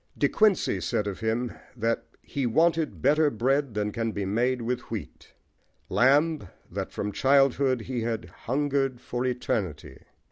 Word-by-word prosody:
De - - +3
Quincey 195 - +2
said 105 - -1
of 100 -2 -4
him 115 +2 -1 0.3
that 115 +1 0 0.2
"he 135 -3 -2
wanted 165 +5 +1
better 150 +3 +4
bread 135 +1 0
than 105 0 0
can 115 +1 -2
be 100 -2 -3
made 120 +6 +1
with 125 +2 -3
wheat:" - - -7 0.5
Lamb, 145 - +4 0.3
that - - -4
from 105 - -3
childhood 135 0 +3
he 125 +1 -3
had 115 -1 -2
"hungered 135 -1 -1
for 125 +1 -3
eternity." 95 - -3
125 Hz, 145 wpm, -27 LUFS, 110-140 Hz, 0.5 s, better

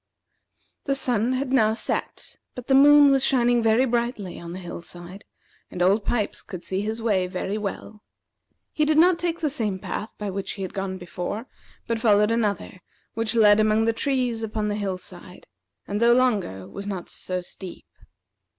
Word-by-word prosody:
The 275 - +1
sun 245 -2 +1
had 260 0 -2
now 220 -4 +3
set; - - -4 0.2
but 250 - -7
the 270 - +1
moon 290 +1 +7
was 270 -1 +3
shining 245 -3 +3
very 225 +3 +3
brightly 235 -6 -2
on 170 0 -8
the 180 - -6
hill 175 -1 -7
side, 175 +3 -9 0.4
and - - -8
Old 195 +4 +3
Pipes 220 -4 -1
could 185 -5 -9
see 190 +2 -1
his 220 +2 -3
way 195 -5 +1
very 185 +2 -3
well. 210 0 -5 0.7
He 305 - 0
did 305 0 +2
not 345 +1 +5
take 340 0 -2
the 305 - +1
same 215 -8 -1
path 210 +3 -5
by 205 -2 -4
which 195 +1 -4
he 195 - -6
had 185 - -6
gone 195 -1 -3
before, 180 +5 -5 0.4
but 230 -1 -2
followed 210 -1 +4
another, 210 -5 -2 0.3
which 225 0 -1
led 210 -2 +6
among 215 +1 +3
the 230 - +2
trees 250 -2 -1
upon 215 -1 -2
the 205 - -1
hill 195 -3 -2
side, 180 0 -10 0.4
and, 205 +2 -2
though 235 0 +6
longer, 205 - 0
was 200 - -8
not 190 -4 -5
so 185 -1 -5
steep. 180 0 -10
215 Hz, 185 wpm, -24 LUFS, 190-245 Hz, 0.7 s, moon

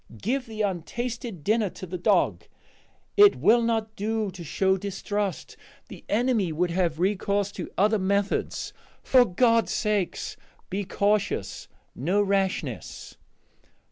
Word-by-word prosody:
Give 255 +4 -1
the 220 -1 -3
untasted 215 - -4
dinner 215 +2 +2
to 185 - -9
the 180 0 -6
dog; - - +2 0.7
it 410 0 +7
will 235 +2 +4
not 225 -2 -1
do 215 0 -1
to 180 -1 -9
show 190 +5 +1
distrust; 200 0 -3 0.3
the - - -11
enemy 220 -5 +1
would 170 +3 0
have 170 -3 0
recourse 200 +1 0
to 185 - -6
other 210 +2 +3
methods. 200 +2 -1 0.3
For 255 -2 +5
God's 230 +3 +2
sake, 210 -5 0 0.5
be 200 +2 -2
cautious! 200 - -1 0.3
no 180 +10 0
rashness!" 195 -2 -2
205 Hz, 125 wpm, -26 LUFS, 185-220 Hz, 0.7 s, it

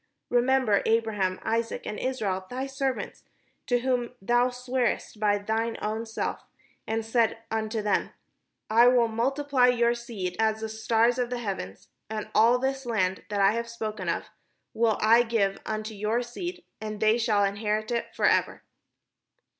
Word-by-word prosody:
Remember 245 -3 +3
Abraham, 215 -5 +1
Isaac, 230 0 -1
and 210 - -4
Israel, 200 -8 -2
thy 255 +2 -3
servants, 270 -1 -3 0.5
to 245 -1 +2
whom 250 -1 -1
thou 240 +5 +2
swarest 250 -3 -2
by 205 -1 +3
thine 225 +2 -2
own 220 +2 -3
self, 225 - -3 0.5
and 225 0 -1
saidst 225 0 +2 0.2
unto 220 0 -2
them, 205 - +1 0.3
' - - -54
I 235 +2 +7
will 245 -2 +5
multiply 260 +3 +2
your 240 -1 +3
seed 225 -7 -5
as 220 0 +1
the 220 - -3
stars 225 +2 +2
of 245 -1 -1
heaven, 195 - -4 0.3
and 215 -1 -5
ail 230 +3 +6
this 265 0 -2
land 190 -5 0
that 205 -1 0
I 195 0 +6
have 235 +1 -3
spoken 215 -5 -4
of 170 - -3 0.4
will 225 -2 +2
I 230 +2 +6
give 225 -5 0
unto 215 0 -3
your 215 +4 -1
seed, 350 +9 -6 0.2
and 215 -1 -5
they 220 +2 +3
shall 215 -3 +2
inherit 210 +2 -1
it 235 -1 -1
forever.' - - +2
225 Hz, 155 wpm, -27 LUFS, 215-245 Hz, 0.5 s, I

